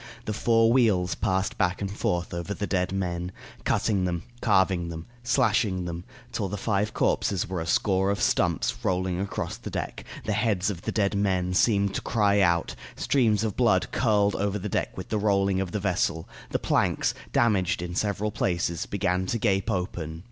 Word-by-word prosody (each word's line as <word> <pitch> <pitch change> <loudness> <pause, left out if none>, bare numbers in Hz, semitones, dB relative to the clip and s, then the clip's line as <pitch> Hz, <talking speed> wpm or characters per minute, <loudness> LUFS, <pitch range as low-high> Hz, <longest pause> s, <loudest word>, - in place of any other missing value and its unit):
The 110 - -2
four 115 +1 +3
wheels 100 -8 +3
passed 95 +1 -1
back 90 +1 +1
and 100 -1 -3
forth 85 -3 -1
over 85 +4 -3
the 105 - -2
dead 90 -2 0
men, 90 -2 -2 0.3
cutting 100 -4 +1
them, 85 -1 -2 0.2
carving 95 -5 +2
them, 80 -1 -7 0.2
slashing 115 -7 +1
them, 85 0 -5 0.3
till - - -2
the 105 - -3
five 105 +1 0
corpses 95 -4 0
were 90 -2 -3
a 80 - -5
score 95 +1 +2
of 100 - 0
stumps 105 +8 +1
rolling 90 -3 0
across 100 0 -3
the - - -7
deck; - - -4 0.2
the 105 - 0
heads 105 -2 +1
of 85 -4 -7
the - - -3
dead 100 -2 +1
men 95 -3 0
seemed 100 0 +3
to - - -2
cry 100 -2 +2
out; 85 -3 +2 0.2
streams 110 -6 +2
of 110 -3 -2
blood - - +2
curled 105 -1 +2
over 100 0 0
the 105 +1 -4
deck - - -2
with - - -6
the 110 - 0
rolling 100 -2 +2
of 95 -2 -3
the 105 - -2
vessel; 90 -4 0 0.2
the - - 0
planks, - - +1 0.2
damaged 95 -7 +2
in 90 0 -5
several 105 +2 -1
places, 85 -4 -1
began 95 -2 0
to 115 - 0
gape 100 -4 +1
open. 85 -3 -3
95 Hz, 185 wpm, -26 LUFS, 90-105 Hz, 0.3 s, four